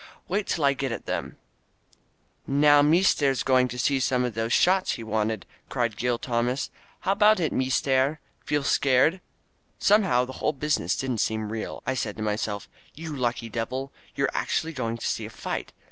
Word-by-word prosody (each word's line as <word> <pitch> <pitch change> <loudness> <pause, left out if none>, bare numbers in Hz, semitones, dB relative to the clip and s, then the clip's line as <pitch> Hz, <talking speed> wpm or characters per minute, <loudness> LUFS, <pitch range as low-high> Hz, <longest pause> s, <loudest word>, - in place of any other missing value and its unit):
"Wait 200 +2 -1
till 155 - 0
I 140 - +4
get 135 -1 -3
at 115 - -5
them - - -4 0.6
!" - - -41 0.2
"Now 145 -1 +7
meester's 150 -4 +3
going 130 -1 +3
to 125 0 -7
see 135 +2 +1
some 125 -1 +1
of 125 - -3
those 115 +1 -2
shots 185 +6 +3
he 115 - -6
wanted," 110 0 -1 0.2
cried 120 -4 -1
Gil 120 +2 0
Tomas. 120 +2 -1 0.3
"How 190 - +1
about 210 +1 +5
it, 160 -4 0
meester? 130 +3 +1 0.2
Feel 145 -1 0
scared?" 140 +8 +3 0.6
Somehow 195 - +3
the 130 - -8
whole 150 - +1
business 150 +2 0
didn't 130 -4 -2
seem 110 0 -1
real. 110 -1 -5
I 130 - 0
said 110 -4 -3
to 110 - -4
myself, 105 -1 -2 0.3
"You 160 -1 -6
lucky 120 -3 -1
devil, 125 +4 -4 0.2
you're 135 -1 +1
actually 165 +1 -1
going 115 -5 -3
to - - -6
see - - -2
a - - -10
fight. - - -5
130 Hz, 180 wpm, -26 LUFS, 115-150 Hz, 0.6 s, Now